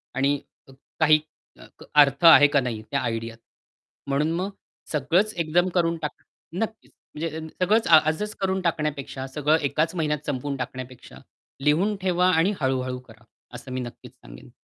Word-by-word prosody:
आणि 140 +2 +2 0.3
अ - - -15 0.3
काही 155 -1 +5 0.4
अ, - - -13 0.4
अर्थ 145 +4 +2
आहे 145 -3 +9
का 145 -1 +2
नाही 115 -4 -4
त्या - - +1
आयडियात. 115 0 -4 0.7
म्हणून 145 +3 0
मग 190 +3 -2 0.4
सगळंच 170 +9 +1
एकदम 175 +2 +1
करून 170 -1 +1
टाक 150 - -5 0.4
नक्कीच, 225 0 -5 0.2
म्हणजे 160 0 -4
अ, - - -4 0.2
सगळंच 220 +4 +2
आ 160 -2 +8
आजच 210 +7 -3
करून 190 0 0
टाकण्यापेक्षा 150 -5 -3
सगळं 150 +3 +1
एकाच 165 +5 -1
महिन्यात 150 -2 -1
संपवून 140 +1 -2
टाकण्यापेक्षा 130 0 -8 0.5
लिहून 185 +8 +2
ठेवा 180 0 +2
आणि 180 +6 +2
हळू-हळू 130 -1 -1
करा 110 -3 -18 0.3
असं 130 +1 -9
मी 130 0 -3
नक्कीच 120 -1 -10
सांगेन. - - -14
150 Hz, 155 wpm, -24 LUFS, 130-170 Hz, 0.7 s, आहे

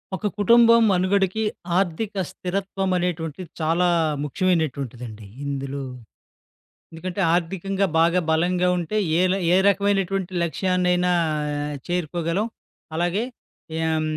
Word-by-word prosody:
ఒక 210 - -2
కుటుంబం 230 +3 +6
మనుగడకి, 190 +2 +1 0.4
ఆర్థిక 195 +2 -1
స్థిరత్వం 190 +1 -3
అనేటువంటిది 175 -1 -3
చాలా 165 +3 +2 0.4
ముఖ్యమైనటువంటిదండి 135 - -2 0.2
ఇందులో. 140 0 -3 1.1
ఎందుకంటే, 175 +4 -5
ఆర్థికంగా 195 +3 0
బాగా 170 +2 +4
బలంగా 180 +3 +2
ఉంటే 175 +4 -3 0.2
ఏ - - +3
ల - - +2 0.2
ఏ - - +6
రకమైనటువంటి 195 -1 +1
లక్ష్యాన్నైనా 180 +1 +1 0.8
చేరుకోగలం. 175 +3 -1 0.5
అలాగే, 175 +6 0 0.6
ఏం 160 -1 +1
180 Hz, 95 wpm, -23 LUFS, 165-195 Hz, 1.1 s, కుటుంబం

